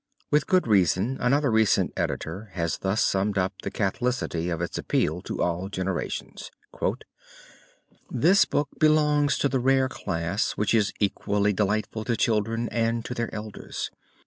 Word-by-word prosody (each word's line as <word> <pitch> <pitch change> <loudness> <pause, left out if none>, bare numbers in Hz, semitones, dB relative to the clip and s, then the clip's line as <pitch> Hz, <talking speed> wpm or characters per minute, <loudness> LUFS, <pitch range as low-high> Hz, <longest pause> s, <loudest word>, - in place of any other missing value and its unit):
With 150 -1 +3
good 185 -1 +3
reason 105 +3 +2
another 140 +2 +2
recent 110 -2 +3
editor 105 +2 -3
has 85 -2 -2
thus 95 +3 +1
summed 100 +1 +1
up 95 +1 +1
the - - -3
catholicity 110 -6 -1
of 85 -2 -2
its 85 - -3
appeal 80 +4 0
to - - -3
all 90 +2 -1
generations: 95 -2 -4 1.6
"This 180 +11 +4
book 145 - -1
belongs 150 -1 +3
to - - +2
the 135 -1 0
rare 130 +1 +3
class 85 -2 -2
which 105 +1 0
is 110 -3 +3
equally 100 0 +1
delightful 105 +2 -1
to 120 -2 0
children 115 +1 +1
and 115 0 0
to - - -4
their 115 -2 -3
elders. 105 -1 -6
110 Hz, 145 wpm, -26 LUFS, 95-125 Hz, 1.6 s, This